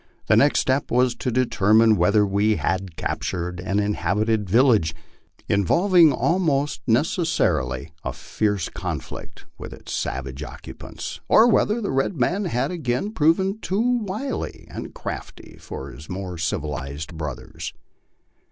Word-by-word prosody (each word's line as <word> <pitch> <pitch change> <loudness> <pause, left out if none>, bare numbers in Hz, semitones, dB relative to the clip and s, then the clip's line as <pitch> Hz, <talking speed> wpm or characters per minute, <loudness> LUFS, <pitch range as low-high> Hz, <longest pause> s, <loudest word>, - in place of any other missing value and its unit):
The - - +4
next 145 +1 +4
step 130 +1 0
was 125 0 +3
to - - -2
determine 110 -2 +4
whether 105 +3 +4
we 100 +2 +2
had 95 -3 -2
captured 90 0 -3
an 95 +2 -1
inhabited 105 0 0
village, 110 - +4 0.5
involving 170 - +4
almost 150 -5 +1
necessarily 80 - +1
a - - -2
fierce 105 -5 -1
conflict - - -6
with - - -7
its - - -9
savage 65 +1 -3
occupants, 75 - -8
or 220 - +7
whether 220 0 +3
the 205 - -2
red 135 +5 0
man 190 +11 +1
had 135 -3 -1
again 160 +3 -2
proven 190 +4 +2
too 235 +5 +1
wily 215 +7 -4
and - - -7
crafty - - -7
for - - -7
his 75 - -12
more 95 -1 -5
civilized 75 -1 -4
brothers. 75 -4 -6
110 Hz, 130 wpm, -23 LUFS, -, 0.5 s, or